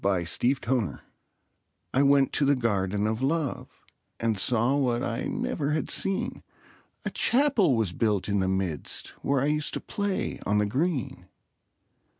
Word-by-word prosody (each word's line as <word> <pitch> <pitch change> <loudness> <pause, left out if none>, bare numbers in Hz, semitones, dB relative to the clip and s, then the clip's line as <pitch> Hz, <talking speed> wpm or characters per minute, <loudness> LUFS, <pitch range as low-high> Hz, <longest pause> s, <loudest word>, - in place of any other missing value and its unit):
THE - - +2
GARDEN 90 -3 +1
OF 85 - -2
LOVE 125 -3 +1 1.0
I 135 - +3
went 140 -1 +4
to - - +1
the 140 +1 +4
Garden 105 -4 0
of 110 +2 -1
Love, 145 0 -1 0.5
And 115 -1 +1
saw 120 +6 +1
what 125 -3 +1
I 115 -3 -2
never 145 -1 -2
had 155 -3 -1
seen; 195 0 0 0.6
A - - -2
Chapel 240 - +3
was 110 -6 0
built 105 -2 0
in 100 -1 +1
the 95 - +1
midst, 95 -6 -2
Where 140 -1 +1
I - - +1
used 150 0 -1
to - - -2
play 205 -2 -3
on 105 - +1
the 105 - +3
green. 135 - -2
125 Hz, 160 wpm, -27 LUFS, 105-145 Hz, 1.0 s, went